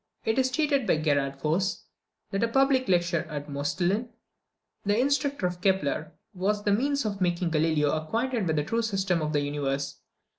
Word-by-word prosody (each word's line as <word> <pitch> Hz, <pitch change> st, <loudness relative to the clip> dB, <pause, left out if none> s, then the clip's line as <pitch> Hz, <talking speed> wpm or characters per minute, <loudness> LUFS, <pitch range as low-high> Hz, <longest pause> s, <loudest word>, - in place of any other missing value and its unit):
It 220 Hz, +3 st, +2 dB
is 260 Hz, -, +3 dB
stated 280 Hz, -2 st, +1 dB
by 170 Hz, -, +3 dB
Gerard 140 Hz, -3 st, 0 dB
Voss, 175 Hz, +6 st, 0 dB, 0.5 s
that 195 Hz, -, -1 dB
a 230 Hz, -, +3 dB
public 270 Hz, +1 st, +3 dB
lecture 175 Hz, -2 st, +2 dB
of 145 Hz, -2 st, -5 dB
Moestlin, 175 Hz, -, -1 dB, 0.7 s
the 205 Hz, +2 st, +1 dB
instructor 280 Hz, -3 st, +1 dB
of 180 Hz, 0 st, -2 dB
Kepler, 160 Hz, -6 st, 0 dB, 0.2 s
was 205 Hz, +3 st, -1 dB
the 205 Hz, -, +2 dB
means 280 Hz, +4 st, +1 dB
of 200 Hz, -2 st, -3 dB
making 175 Hz, -1 st, +1 dB
Galileo 155 Hz, -2 st, +2 dB
acquainted 225 Hz, +7 st, -1 dB
with 160 Hz, -, +1 dB
the 150 Hz, -, +1 dB
true 230 Hz, +10 st, 0 dB
system 195 Hz, -6 st, 0 dB
of 155 Hz, 0 st, -1 dB
the 145 Hz, -1 st, +1 dB
universe. 140 Hz, -1 st, -2 dB
185 Hz, 175 wpm, -27 LUFS, 155-230 Hz, 0.7 s, is